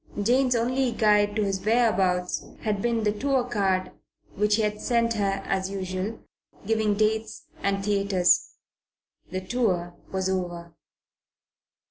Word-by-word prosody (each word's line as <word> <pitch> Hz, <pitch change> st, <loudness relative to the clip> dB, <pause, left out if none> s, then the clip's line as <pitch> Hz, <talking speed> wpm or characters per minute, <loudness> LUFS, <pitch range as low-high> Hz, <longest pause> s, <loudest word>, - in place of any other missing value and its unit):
Jane's 250 Hz, +4 st, +3 dB
only 250 Hz, +2 st, +1 dB
guide 210 Hz, -2 st, +3 dB
to 215 Hz, -, +1 dB
his 195 Hz, -1 st, -2 dB
whereabouts 195 Hz, -6 st, +1 dB, 0.2 s
had 210 Hz, -2 st, -1 dB
been 230 Hz, -1 st, 0 dB
the 210 Hz, -, +2 dB
tour 265 Hz, +4 st, 0 dB
card 195 Hz, -6 st, 0 dB, 0.4 s
which 210 Hz, +1 st, +2 dB
he 220 Hz, -, +1 dB
had 210 Hz, 0 st, -2 dB
sent 230 Hz, -1 st, +1 dB
her 195 Hz, -2 st, -1 dB
as 190 Hz, 0 st, -1 dB
usual, 190 Hz, +2 st, -4 dB, 0.4 s
giving 215 Hz, -1 st, +1 dB
dates 220 Hz, +1 st, -1 dB, 0.2 s
and 195 Hz, 0 st, -1 dB
theatres. 200 Hz, -3 st, +2 dB, 0.7 s
And -, -, -11 dB
the -, -, -17 dB
tour 185 Hz, -8 st, 0 dB, 0.2 s
was 190 Hz, 0 st, -1 dB
over. 175 Hz, -3 st, -3 dB
205 Hz, 135 wpm, -26 LUFS, 190-225 Hz, 0.7 s, Jane's